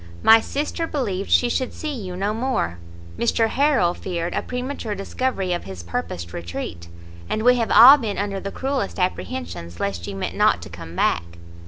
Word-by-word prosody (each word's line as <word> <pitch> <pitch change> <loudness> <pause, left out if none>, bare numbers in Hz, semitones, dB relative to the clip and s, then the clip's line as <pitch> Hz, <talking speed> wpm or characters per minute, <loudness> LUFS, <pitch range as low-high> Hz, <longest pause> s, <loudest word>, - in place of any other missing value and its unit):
My 225 0 +8
sister 300 +6 -3
believed 205 - -2
she 245 - +4
should 250 +1 -1
see 305 -1 -4
you 190 -8 -6
no 200 +3 0
more, 225 - -1 0.4
Mr 230 -1 +2
Harrel 265 - +2
feared 175 -2 -4
a - - 0
premature 250 -3 -4
discovery 195 -2 -2
of 175 - -4
his 95 -3 -8
purposed 85 0 -5
retreat, 85 0 -6 0.4
and 215 - -1
we 250 +1 +5
have 230 -2 0
all 265 +5 +10
been 220 -7 -3
under 200 -1 -2
the 195 +1 -5
cruellest 270 -6 -2
apprehensions 85 - -3
lest 90 -4 -3
you - - -5
meant 95 - -4
not - - +3
to - - -10
come 80 +1 -10
back." 85 -1 0
195 Hz, 180 wpm, -22 LUFS, -, 0.4 s, all